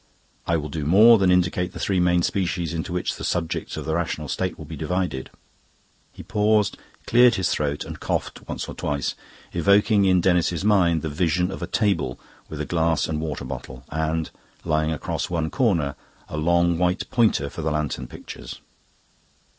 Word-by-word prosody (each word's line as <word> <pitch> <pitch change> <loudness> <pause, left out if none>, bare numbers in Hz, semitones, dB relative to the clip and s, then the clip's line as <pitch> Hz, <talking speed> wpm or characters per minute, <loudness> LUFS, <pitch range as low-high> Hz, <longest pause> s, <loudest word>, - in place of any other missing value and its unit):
I 85 - +2
will 75 -1 -4
do 75 +1 -4
more 105 +9 +7
than 95 -1 +3
indicate 90 0 +1
the - - -8
three 95 -2 +1
main 90 0 +3
species 85 -4 -1
into 80 0 -4
which 90 0 -2
the - - -7
subjects 80 -2 -2
of - - -5
the 80 - -1
Rational 80 -2 -2
State 95 +4 -2
will 80 - -9
be 80 +2 -7
divided." 80 -3 -2 0.8
He - - -11
paused, 105 -1 +2 0.3
cleared 120 0 +5
his 95 - 0
throat, 75 -1 -1
and - - -8
coughed - - -3
once - - -4
or - - -6
twice, 70 -1 -2 0.4
evoking 100 +4 +4
in 95 -1 +4
Denis's 90 0 +1
mind 90 -6 +3
the 80 - -2
vision 90 +3 0
of - - -7
a - - -3
table 95 - 0 0.3
with - - -7
a - - -2
glass 80 -1 +1
and 80 -1 -2
water 75 -3 -4
bottle, 65 -1 -7
and, 80 +1 -1 0.3
lying 80 -1 +1
across 80 - -3
one 80 -2 -1
corner, 85 - +1 0.3
a - - -7
long 85 +2 +2
white 90 +1 0
pointer 110 - +2
for 75 - -7
the 80 - 0
lantern 75 -2 -2
pictures. - - -9
85 Hz, 180 wpm, -24 LUFS, 80-95 Hz, 0.8 s, more